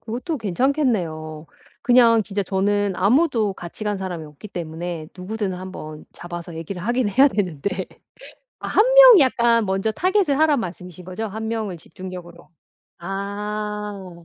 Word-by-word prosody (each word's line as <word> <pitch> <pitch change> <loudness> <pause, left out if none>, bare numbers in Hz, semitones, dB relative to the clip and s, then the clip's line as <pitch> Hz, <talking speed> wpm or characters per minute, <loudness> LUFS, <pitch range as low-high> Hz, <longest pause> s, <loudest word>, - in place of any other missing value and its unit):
그것도 255 +8 -4
괜찮겠네요. 185 - -1 0.4
그냥 235 -2 +5
진짜 200 -1 -3
저는 200 +1 0
아무도 225 - +2
같이 175 +5 -8
간 205 -1 -1
사람이 175 -4 -5
없기 150 +7 -12
때문에 165 -2 -6
누구든 200 +2 -3
한번 180 -4 -8
잡아서 175 -1 -8
얘기를 170 +2 -6
하긴 240 +1 0
해야 265 +8 +5
되는데 185 - -2 0.7
아 - - -5
1 425 - +4
명이 - - +10
약간 235 -3 +3
먼저 195 +3 0
target을 365 - +1
하란 300 -4 +3
말씀이신 180 -1 -8
거죠? 220 +5 -4
1 220 +2 -5
명을 215 -5 -3
집중적으로 175 0 -10 0.5
아 200 -1 -5
200 Hz, 320 characters per minute, -22 LUFS, 175-230 Hz, 0.7 s, 명이